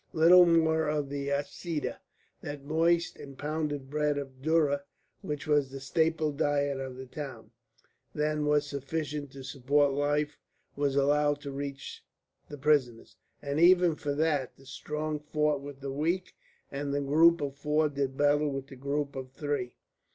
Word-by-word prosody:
Little 175 +2 +7
more 160 -1 +3
of 150 -2 -1
the 140 0 -3
"aseeda" 145 +3 -3 0.4
that 145 -1 -6
moist 165 +3 +1
and 140 -2 -11
pounded 145 -2 -3
cake 150 -1 +1
of 135 -2 -7
dhurra 150 -2 +2 0.4
which 145 -1 -4
was 145 -3 +2
the 135 +1 -7
staple 160 +2 +1
diet 145 -1 0
of 130 -1 -5
the 130 - -7
town 130 -6 -8 0.6
than 150 0 -1
was 150 0 +3
sufficient 145 0 -4
to 135 -1 -9
support 140 +2 +1
life 145 +1 0 0.4
was 140 -1 0
allowed 145 +1 +2
to 140 - -6
reach 140 0 -6 0.5
the 145 - -7
prisoners, 135 -5 +1 0.3
and 140 +1 -1
even 175 0 +6
for 145 -2 -3
that 150 -4 0
the 135 - -18
strong 150 +3 -4
fought 150 -1 0
with 140 -1 -9
the 135 0 -4
weak, 165 +6 -1 0.4
and 140 0 -3
the 145 - 0
group 165 +4 +5
of 140 -2 -3
four 150 +2 +1
did 140 -2 -3
battle 145 +1 +3
with 135 -1 -4
the 135 - -10
group 140 +2 -2
of 130 -1 -6
three. 145 -4 -3
145 Hz, 160 wpm, -29 LUFS, 140-150 Hz, 0.6 s, Little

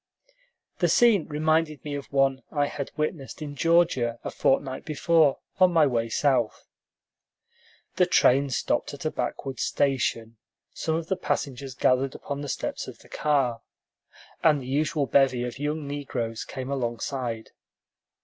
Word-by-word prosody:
The 175 - +3
scene 205 -1 +4
reminded 155 -1 0
me 145 - -4
of 140 -1 -6
one 135 -1 +2
I 145 -2 +1
had 140 -1 -5
witnessed 150 -2 -3
in 145 -2 -6
Georgia 160 -8 +2
a - - -4
fortnight 135 -1 0
before, 155 -1 +3 0.2
on 185 -1 +6
my 165 -3 +5
way 115 -4 0
south. 125 -3 +1 1.3
The - - +4
train 140 +2 +4
stopped 130 - -1
at - - -10
a - - +1
backwoods 135 -1 -4
station; 115 -4 0 0.4
some 160 - -1
of 165 0 -2
the 190 - -1
passengers 135 -7 -3
gathered 130 +1 +2
upon 140 0 -5
the 145 - -5
steps - - -3
of - - -9
the - - -19
car, 135 -6 0 0.8
and 150 -3 +4
the 130 - -8
usual 145 +1 0
bevy 130 -3 +3
of 125 +1 -5
young 150 +1 -2
negroes 125 -6 -4
came 130 0 -6
alongside. 120 -2 -3
140 Hz, 150 wpm, -26 LUFS, 130-150 Hz, 1.3 s, on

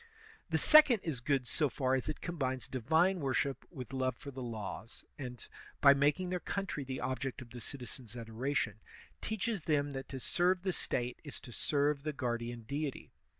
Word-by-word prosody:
The 160 - +2
second 275 - +8
is 145 -7 -2
good 135 -1 +1
so 150 +1 +1
far 130 0 0
as 130 +2 +1
it 155 - -4
combines 130 - -2
divine 160 +9 +2
wor 135 -4 0
ship 140 -1 0
with 135 -5 -8
love 130 -2 0
for 140 - -8
the 130 0 -7
laws, 110 -2 -6
and, 125 -3 -6 0.3
by 140 -1 +9
making 145 +6 +2
their 180 - 0
coun 195 +3 -2
try 150 -5 -3
the 130 0 -4
object 130 +1 -2
of 120 -3 -11
the 120 0 -8
citizens' 125 -2 -7
adoration, 115 -1 -1 0.4
teaches 220 -1 -1
them 145 -2 +2
that 135 -1 -6
to 135 - -5
serve 180 +6 +2
the 190 -2 0
State 125 -5 -2
is 145 - -6
to 130 - -10
serve 145 +3 +1
the 155 +1 -2
guardian 120 -3 -2
deity. 140 +3 -4
135 Hz, 190 wpm, -34 LUFS, 125-155 Hz, 0.4 s, by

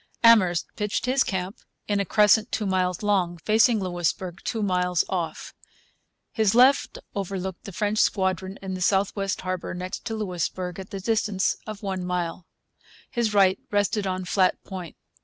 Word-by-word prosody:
Amherst 190 -7 +5
pitched 210 +2 -2
his 265 +2 +3
camp 190 0 -3 0.3
in 205 -1 +1
a 200 - 0
crescent 210 +3 +4
two 215 - -1
miles 185 -1 0
long, 185 -4 +1
facing 220 +5 +3
Louisbourg 175 -1 -2
two 225 -3 -2
miles 180 -2 +1
off. 175 -3 -4 0.8
His 220 -2 +2
left 260 +3 +4 0.2
overlooked 190 -2 -4
the 195 - -7
French 210 +3 -1
squadron 190 -1 0
in 190 -1 -4
the 185 - -5
south 195 +2 +2
west 195 -2 -2
harbour 185 -1 -4
next 180 +1 -5
to 225 -2 -3
Louisbourg 180 -2 -3
at 190 - -8
the 195 - -5
distance 210 -2 +1
of 215 -1 -7
a 195 -1 -2
mile. 180 -1 -3 0.6
His 230 -4 0
right 190 -1 +4
rested 205 0 0
on 185 0 -2
Flat 185 0 +1
Point. 185 -4 -8
190 Hz, 160 wpm, -25 LUFS, 180-210 Hz, 0.8 s, Amherst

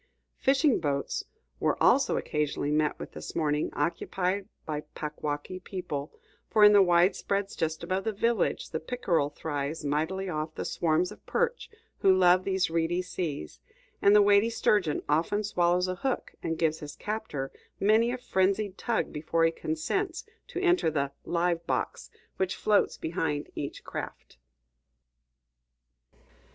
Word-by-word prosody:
Fishing 275 0 +3
boats 140 -2 -2 0.3
were - - +1
also - - +4
occasionally 150 -1 -1
met 150 0 +1
with - - -8
this - - -8
morning, 150 -2 +1
occupied 185 +3 -1 0.2
by 150 -1 -3
Packwaukee 150 +4 -4
people; 170 -7 -5 0.4
for 215 -2 +4
in 210 0 +9
the 205 - +8
widespreads 190 +2 +2
just 160 -1 -2
above 190 +2 -1
this 220 -3 -2
village, 230 -2 0
the 160 - -2
pickerel 165 - 0
thrives 145 +1 -4
mightily 160 +7 -1
off 155 -2 -3
the - - -4
swarms 170 +2 +1
of - - -13
perch 480 0 -1 0.3
who 195 - +5
love 180 0 +5
these 190 -1 +1
reedy 170 +2 0
seas; 160 - -5 0.4
and 200 +1 +6
the 210 - +7
weighty 205 +2 +5
sturgeon 205 -8 +1
often 165 +8 +1
swallows 180 -2 +2
a 185 - -1
hook 265 +3 -2
and 165 0 -2
gives 160 -1 +1
his 145 -1 -8
captor 210 -11 -4 0.3
many 220 +4 +4
a 255 - -2
frenzied 195 -3 0
tug 235 -2 -1
before 165 +2 +1
he 165 - +3
consents 335 - -2 0.2
to - - -5
enter 355 - +3
the 140 -3 -1
"live 170 0 0
box" - - -2 0.3
which 190 0 0
floats 210 -1 +2
behind 160 -2 -2
each 140 - -5
craft. - - -7
175 Hz, 145 wpm, -28 LUFS, 155-205 Hz, 0.4 s, in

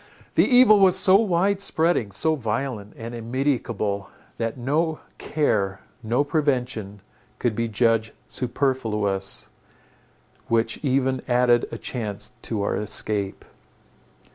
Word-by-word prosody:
The - - +4
evil 245 -5 +6
was 190 -1 +5
so 190 0 +6
wide 200 -1 +1
spreading, 160 - +1
so 160 +11 +2
violent 115 -4 -3
and 115 +1 -7
immedicable, 115 -4 -2 0.3
that 115 +1 -2
no 155 +6 0 0.2
care, 100 -10 0 0.2
no 120 +5 +1
prevention 125 -9 -1 0.4
could 120 -3 -1
be 115 +1 -1
judged 110 0 +1
superfluous, 110 -7 -2 1.0
which 115 +3 0
even 130 -2 +1
added 120 -1 +3
a - - -5
chance 105 -3 -5
to 105 -3 -2
our - - -1
escape. 105 -1 -2
120 Hz, 115 wpm, -24 LUFS, 105-145 Hz, 1.0 s, evil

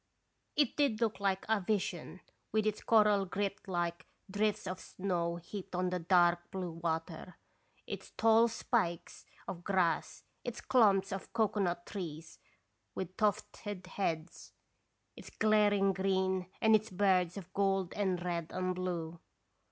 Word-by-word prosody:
It 290 -4 +2
did 280 -7 +2
look 225 -4 0
like 195 -1 0
a 220 -2 +2
vision, 185 -2 -2 0.3
with 215 0 +1
its 215 -1 0
coral 210 -3 +4
grit 200 +2 -2
like 175 -1 -2 0.2
drifts 210 +1 0
of 185 0 -4
snow 175 -4 -2
heaped 185 +2 -7
on 180 0 0
the 180 - -1
dark 175 0 +3
blue 185 -2 -4
water, 165 +2 -4 0.5
its - - -6
tall 225 +1 +5
spikes 225 -7 -2 0.2
of 175 -1 -6
grass, 185 -4 0 0.2
its 245 -1 -5
clumps 200 -6 +3
of 195 0 -5
cocoanut 200 -6 0
trees 165 -5 -7 0.6
with 185 0 -5
tufted 205 -2 -2
heads, 170 -3 -4 0.6
its - - -11
glaring 205 -2 +3
green, 190 -1 0
and 220 0 +6
its 215 +1 +1
birds 185 -2 +2
of 185 -2 -9
gold 195 -2 +1
and 185 -4 -1
red 170 -2 -2
and 185 0 -1
blue. 170 -2 -4
190 Hz, 135 wpm, -33 LUFS, 175-210 Hz, 0.6 s, and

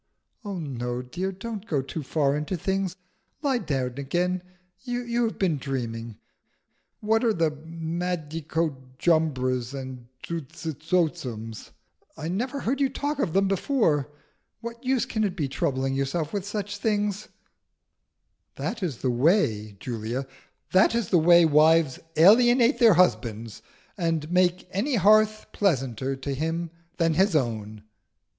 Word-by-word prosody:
"Oh 200 -3 -4
no, 125 -5 -4
dear, 180 +9 -3
don't 210 +2 -7
go 145 -8 0
too 155 +4 -5
far 140 0 +1
into 150 +5 -2
things. 190 +1 -1 0.5
Lie 270 -4 +2
down 130 - -2
again. 175 +6 0 0.4
You 245 -1 -1
have 225 - -3
been 175 -6 +1
dreaming. 115 -5 -4 0.8
What 220 +2 +2
are 230 -2 +3
the 165 -2 +2
Madicojumbras 155 -5 -2
and 130 -2 -8 0.2
Zuzitotzums? 155 - -3 0.5
I 155 - -5
never 250 +10 -2
heard 270 +4 -1
you 275 - +3
talk 290 +1 -3
of 185 - 0
them 195 0 +3
before. 190 - +1 0.5
What 235 +2 -8
use 260 -1 +1
can 220 -2 -1
it 195 -3 -1
be 155 -7 -1
troubling 135 0 -1
yourself 140 +4 -2
about 200 -2 -2
such 205 0 -4
things?" 205 -1 -1 1.3
"That 225 -1 -4
is 155 -10 -3
the 130 - +2
way, 120 - +2
Julia 120 +3 -4 0.5
that 190 +4 +5
is 235 -6 -1
the 175 - +4
way 170 +1 +6
wives 155 -2 +4 0.2
alienate 240 - +6
their 230 -6 +7
husbands, 115 - +1 0.4
and 165 -2 -1
make 180 0 +2
any 245 +9 0
hearth 215 +1 +4
pleasanter 135 - 0
to 135 +1 -4
him 165 +4 -2 0.3
than 165 -2 +2
his 190 +2 +3
own!" 110 -6 -2
165 Hz, 135 wpm, -26 LUFS, 135-205 Hz, 1.3 s, their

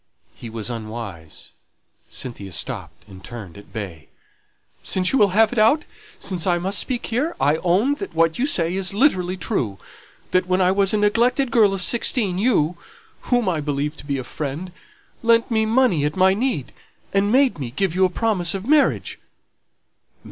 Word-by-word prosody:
He 115 - -10
was 110 +1 -5
unwise 110 -8 -8 0.6
Cynthia 100 -7 -6
stopped, - - -4
and 95 -1 -13
turned 110 -8 -9
at 100 - -14
bay. 90 -9 -7 0.8
"Since 185 -1 +1
you 270 - +3
will 205 - +6
have 225 +1 +5
it 240 - 0
out, 230 +8 +4 0.3
since 185 -2 -3
I 175 -1 +3
must 190 +3 0
speak 250 -3 -2
here, 270 +9 -1
I 150 +2 +3
own 190 - +2
that - - -6
what 165 +2 +2
you 270 - +2
say 170 - +1
is 190 +1 0
literally 190 -8 +2
true; 125 - -2 0.5
that 185 0 +2
when 185 0 +1
I 185 0 +4
was 195 0 +2
a 215 - +2
neglected 235 +5 +2
girl 215 -4 +5
of 195 -2 -3
sixteen, 215 -5 +1
you 180 -8 +2 0.5
whom 245 -4 +2
I 165 -5 0
believed 145 +1 -3
to - - -11
be 140 -1 -1
a 130 - -4
friend, 155 +7 -5 0.5
lent 230 0 +3
me 220 -1 +2
money 225 - +3
at 150 +1 -1
my 190 0 +4
need, 200 - -2 0.4
and 200 +1 +2
made 260 - +3
me 130 -4 -4
give 170 +7 -1
you 185 +1 +2
a 185 - +4
promise 185 -3 0
of 195 +1 -5
marriage." 295 +2 +2
185 Hz, 180 wpm, -22 LUFS, 145-225 Hz, 0.8 s, will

